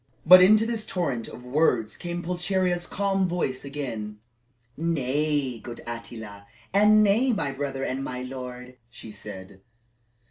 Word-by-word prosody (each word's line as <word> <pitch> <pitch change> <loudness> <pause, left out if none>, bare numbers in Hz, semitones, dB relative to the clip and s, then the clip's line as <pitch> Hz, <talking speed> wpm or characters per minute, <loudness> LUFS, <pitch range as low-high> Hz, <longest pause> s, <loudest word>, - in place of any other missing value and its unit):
But 185 +2 +10
into 215 +4 +6
this 230 -2 -2
torrent 135 -11 -2
of 125 - -11
words 125 -5 +1
came 175 0 -5
Pulcheria's 180 0 0
calm 195 -1 0
voice 170 -7 -2
again. 120 -7 -5 0.6
"Nay, 145 -4 -1
good 120 0 -9
Attila, 110 -3 -8 0.3
and 210 +2 +6
nay, 225 +6 +3
my 145 -10 -1
brother 135 -1 -4
and 135 +1 -2
my 125 -1 -5
lord," 125 -1 -8
she 115 -2 -11
said. 95 -2 -10
140 Hz, 135 wpm, -26 LUFS, 125-180 Hz, 0.6 s, But